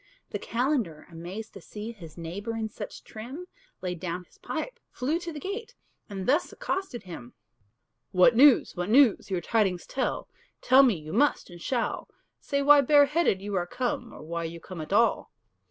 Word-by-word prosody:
The - - -3
calender, 235 - -1
amazed 180 +7 -7
to 195 - -10
see 215 +5 -7
His 170 -8 -12
neighbour 195 +7 -5
in 220 -1 -2
such 205 0 -8
trim, 255 +11 -8 0.4
Laid 180 -2 -3
down 180 0 -4
his - - -26
pipe, - - -5
flew 295 +7 -1
to 345 -1 -6
the 305 - -7
gate, 435 +7 -5 0.3
And 195 -2 -5
thus 295 +7 +2
accosted 385 - -3
him: 160 -10 -9 0.8
"What 195 +6 +5
news? 270 +1 +6
what 180 +1 -3
news? 250 -3 +5
your 185 -2 -1
tidings 190 -3 +1
tell; 260 - -2 0.3
Tell 260 +2 +6
me 250 -6 +4
you 155 -1 -8
must 275 -4 +2
and 175 -1 -11
shall 245 +3 -1 0.3
Say 280 0 -1
why 290 0 +8
bareheaded 285 - +4
you 205 0 -4
are 175 -1 0
come, 245 +1 -2
Or - - -11
why 170 +1 -3
you 165 +1 -6
come 170 0 -8
at 155 - -8
all?" 230 +4 +3
220 Hz, 180 wpm, -28 LUFS, 180-275 Hz, 0.8 s, why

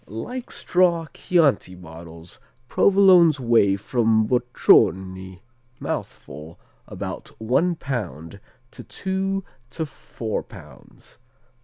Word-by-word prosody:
Like 240 - -7
straw 175 -2 +1
Chianti 140 - +1
bottles, 85 -1 -13 0.3
Provolones 185 -4 +5
weigh 115 -5 +3
from 110 +1 +1
bocconi 95 -6 +1 0.4
(mouthful), 75 +5 -7 0.3
about - - -7
one 135 +11 +1
pound, 100 - -6 0.3
to - - -11
two 195 0 -3 0.3
to 160 +3 -4
four 120 -5 -6
pounds. - - -16
120 Hz, 90 wpm, -22 LUFS, -, 0.4 s, Provolones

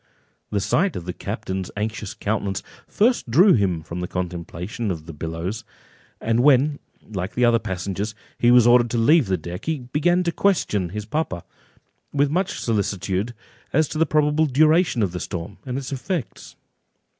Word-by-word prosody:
The 105 - 0
sight 180 - +1
of 85 - -5
the 90 - -4
captain's 95 +1 -4
anxious 105 -1 -3
countenance 100 -2 -2 0.2
first 235 - +1
drew 180 - +6
him 90 -7 +1
from 85 +2 -6
the 90 - -3
contemplation 90 +4 -4
of 80 -4 -4
the 80 - -8
billows; 85 +8 -4 0.6
and 115 +1 +1
when, 140 +2 +4 0.3
like 95 -2 -5
the 125 - +3
other 120 -1 +4
passengers, 100 +2 -4 0.2
he 120 - +4
was 120 -1 +7
ordered 120 0 +5
to 120 - -1
leave 140 +3 +4
the 95 -1 +1
deck, 85 +2 -7
he 160 -1 0
began 150 +8 +1
to 170 - 0
question 130 - +1
his 105 +3 -5
papa, 110 - -2 0.7
with 145 0 +2
much 180 +4 -1
solicitude, 100 0 -1 0.4
as 155 +1 +3
to 155 - -4
the 165 - +3
probable 150 +1 +2
duration 155 - +3
of 95 - 0
the 90 - -4
storm, 85 +3 -6
and 125 0 -2
its 135 -1 -5
effects. 140 - -4
115 Hz, 170 wpm, -23 LUFS, 95-150 Hz, 0.7 s, was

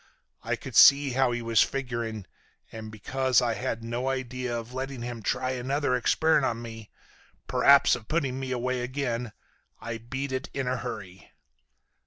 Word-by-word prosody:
I - - -1
could - - -9
see 140 0 +7
how 130 0 +2
he 120 -1 -3
was 115 -2 +3
figuring, 115 -6 -2 0.5
and 110 -1 -8
because 130 +4 +1
I 120 -2 +1
had 115 +2 -3
no 120 +3 -2
idea 125 -2 -3
of 115 +1 -7
letting 130 -1 -5
him 120 -1 -5
try 130 +4 -1
another 130 +2 -1
experiment 160 +6 +2
on 115 -1 -2
me, 115 -2 -9 0.6
p'r'aps 140 -2 +5
of 110 -3 -10
putting 135 -5 -1
me 135 -1 -4
away 125 0 -1
again, 125 -2 -3 0.5
I 115 0 -5
beat 130 +4 -5
it 130 +1 -3
in 135 -2 -2
a 130 0 0
hurry. 95 -5 -8
125 Hz, 165 wpm, -27 LUFS, 115-130 Hz, 0.6 s, see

